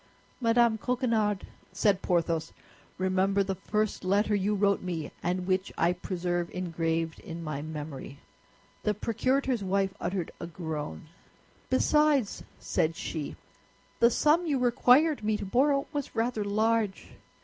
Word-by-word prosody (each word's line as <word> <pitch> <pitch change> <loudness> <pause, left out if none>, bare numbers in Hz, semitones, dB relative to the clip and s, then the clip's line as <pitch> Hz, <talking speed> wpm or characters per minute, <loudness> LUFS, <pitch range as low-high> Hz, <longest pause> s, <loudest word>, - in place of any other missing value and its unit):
"Madame 230 -2 +3
Coquenard," 225 -5 0 0.3
said 200 0 +2
Porthos, 165 -2 0 0.4
"remember 190 +2 +2
the 195 0 -2
first 215 +2 -2
letter 205 +3 +2
you 205 +1 +1
wrote 200 0 +2
me, 170 -5 -4
and 180 +1 -1
which 185 +1 0
I 170 +1 +3
preserve 175 -1 -2
engraved 165 -2 -1
in 165 0 -7
my 155 -3 -4
memory." 150 -3 -7 0.6
The 210 -1 0
procurator's 255 +2 0
wife 195 0 +1
uttered 180 -1 -2
a 170 - -5
groan. 155 - -5 0.6
"Besides," 285 -3 +3 0.2
said 160 +1 0
she, 155 -3 -4 0.6
"the 235 - +6
sum 310 +8 +3
you 290 -3 +1
required 250 +3 +4
me 215 0 +1
to - - -5
borrow 275 +7 +2
was 290 -2 -4
rather 225 -1 0
large." 215 0 0
195 Hz, 130 wpm, -29 LUFS, 175-230 Hz, 0.6 s, the